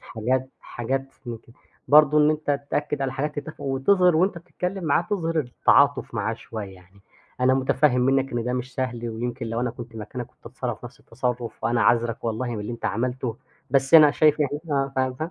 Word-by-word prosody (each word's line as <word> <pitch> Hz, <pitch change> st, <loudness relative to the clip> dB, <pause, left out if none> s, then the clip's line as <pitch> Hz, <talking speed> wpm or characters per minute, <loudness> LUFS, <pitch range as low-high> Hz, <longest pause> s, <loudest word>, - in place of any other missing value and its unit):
حاجات 130 Hz, +4 st, -2 dB
حاجات 130 Hz, +3 st, -3 dB, 0.2 s
من 115 Hz, -2 st, -5 dB
كده، 115 Hz, -, -21 dB, 0.3 s
برضه 150 Hz, 0 st, +6 dB
إن 150 Hz, 0 st, +5 dB
أنت 150 Hz, -2 st, -1 dB
تأكّد 145 Hz, -1 st, -1 dB
على 135 Hz, -1 st, -1 dB
حاجات 145 Hz, +3 st, -3 dB
تتفقوا 140 Hz, -3 st, -4 dB
وتظهِر 180 Hz, +5 st, +4 dB
وأنت 180 Hz, +1 st, +2 dB
بتتكلم 180 Hz, +2 st, -5 dB
معاه 155 Hz, +1 st, +2 dB
تظهِر 165 Hz, -5 st, 0 dB
التعاطف 140 Hz, +1 st, +2 dB
معاه 110 Hz, +1 st, -1 dB
شوية، 110 Hz, -3 st, -8 dB
يعني 95 Hz, +2 st, -20 dB, 0.4 s
أنا 130 Hz, +1 st, +4 dB
متفهّم 130 Hz, 0 st, +2 dB
مِنّك 135 Hz, +1 st, +1 dB
إن 120 Hz, -1 st, -2 dB
ده 125 Hz, -, -1 dB
مش 125 Hz, 0 st, -4 dB
سهل، 120 Hz, -2 st, -3 dB
ويمكن 120 Hz, +2 st, -4 dB
لو 115 Hz, +1 st, -2 dB
أنا 125 Hz, -1 st, -1 dB
كنت 120 Hz, -1 st, -10 dB
مكانك 115 Hz, +3 st, -6 dB
كنت 125 Hz, -, -21 dB
هاتصرّف 120 Hz, -1 st, -5 dB
نَفس 120 Hz, -, -11 dB
التصرف، 120 Hz, 0 st, -4 dB
وأنا 115 Hz, 0 st, +2 dB
عاذرك 115 Hz, -1 st, +2 dB
والله 115 Hz, +2 st, -2 dB
من 115 Hz, -3 st, -4 dB
اللي 105 Hz, +3 st, -5 dB
أنت 115 Hz, -, -9 dB
عملته، 125 Hz, +2 st, -2 dB, 0.3 s
بس 135 Hz, +2 st, +2 dB
أنا 155 Hz, -2 st, +9 dB
شايف 150 Hz, +1 st, +3 dB
إن -, -, +4 dB
إحنا 140 Hz, -1 st, -2 dB
فاهم 130 Hz, -1 st, 0 dB
فا 155 Hz, +6 st, -5 dB
130 Hz, 195 wpm, -24 LUFS, 120-145 Hz, 0.4 s, أنا